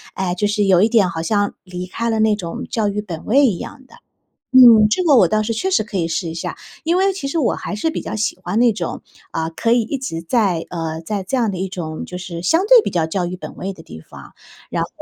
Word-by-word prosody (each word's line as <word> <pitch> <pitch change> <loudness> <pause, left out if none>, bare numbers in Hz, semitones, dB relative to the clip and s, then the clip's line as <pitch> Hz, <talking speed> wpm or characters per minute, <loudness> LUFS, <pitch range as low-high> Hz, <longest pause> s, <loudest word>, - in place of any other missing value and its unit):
哎， 185 -2 -1
就 205 +3 0
是 205 0 +1
有 185 -2 +4
一 220 - +4
点 215 -5 +4
好 160 - -4
像 205 +3 0
离 180 -1 -6
开 230 +5 -3
了 220 -1 0
那 215 -1 +3
种 170 -5 -6
教 215 -3 0
育 205 +1 -2
本 170 -6 -7
位 275 +5 +4
一 200 -8 0
样 265 -2 -9
的。 - - -20 0.6
嗯， 235 -4 +9
这 300 - +1
个 290 -5 +5
我 190 - +6
倒 215 +4 +1
是 225 +1 -2
确 380 +12 -1
实 375 - +2
可 210 -2 -6
以 165 - 0
试 165 +1 -2
一 160 - -5
下， 165 - -5 0.3
因 340 +2 +2
为 390 0 +3
其 370 -7 -5
实 330 - -2
我 275 - +1
还 - - -5
是 215 +10 -1
比 - - -4
较 - - -5
喜 215 - -1
欢 215 - -3
那 240 -1 +5
种， 175 -5 -5 0.3
呃， 160 0 -2
可 230 +8 0
以 240 - +4
一 270 +6 -3
直 165 -11 -4
在 185 -4 0
呃， 160 -2 -4
在 200 +2 -3
这 260 +7 -1
样 230 -3 +1
的 190 - -5
一 190 +1 -2
种 160 -4 -5
就 180 - -7
是 175 -2 -7
相 325 - +3
对 480 -1 +7
比 - - -2
较 165 -3 0
教 180 +2 -2
育 180 - -5
本 - - -9
位 195 +1 -4
的 - - -13
地 80 -1 -11
方。 - - -14 0.4
然 - - -1
后 - - -4
205 Hz, 295 characters per minute, -19 LUFS, 175-235 Hz, 0.6 s, 嗯